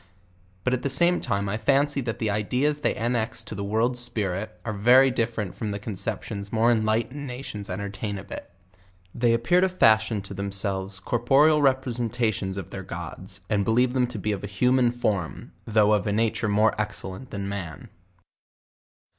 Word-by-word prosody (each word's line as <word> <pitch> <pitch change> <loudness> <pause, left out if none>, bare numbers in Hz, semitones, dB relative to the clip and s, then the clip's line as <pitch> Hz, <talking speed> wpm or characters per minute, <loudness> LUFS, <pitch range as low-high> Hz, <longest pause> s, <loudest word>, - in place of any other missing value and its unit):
But 125 - +1
at 125 - 0
the 140 - -1
same 175 +5 +4
time 100 -4 -1
I 100 +2 -1
fancy 140 +5 +2
thai 115 -3 -2
the 110 -2 -2
ideas 125 +8 0
they 150 - 0
annex 115 0 -1
to - - -7
the 100 -1 -4
word 110 +5 +1
spirit, 110 -5 -2
are 110 - -2
very 125 +6 +5
different 115 -6 -2
from 110 - -4
the 100 - -3
conceptions 100 0 -4
more 115 +1 +3
enlightened 115 +5 0
nations 125 -5 -7
entertain 100 +2 -4
of 95 - -11
it. - - -7 0.6
They 120 -1 +2
appear 120 +11 +3
to 190 - +3
fashion 110 - +3
to 100 - -8
themselves 100 -1 -3
corporeal 135 +9 +3
representations 120 -7 0
of 95 - -6
their - - -5
gods, 95 +1 -8
and 100 -1 +1
believe 120 +4 +2
them 125 -2 +2
to 120 - -7
be 105 +2 -2
of 100 -1 -4
a - - -3
human 125 +5 +3
form, 105 -8 -2 0.2
though 105 -1 +4
of 105 -2 +1
a - - +1
nature 110 +1 0
more 105 +2 +3
excellent 105 +2 -5
than 100 -1 -4
man. 90 -7 -6
110 Hz, 175 wpm, -25 LUFS, 100-125 Hz, 0.6 s, very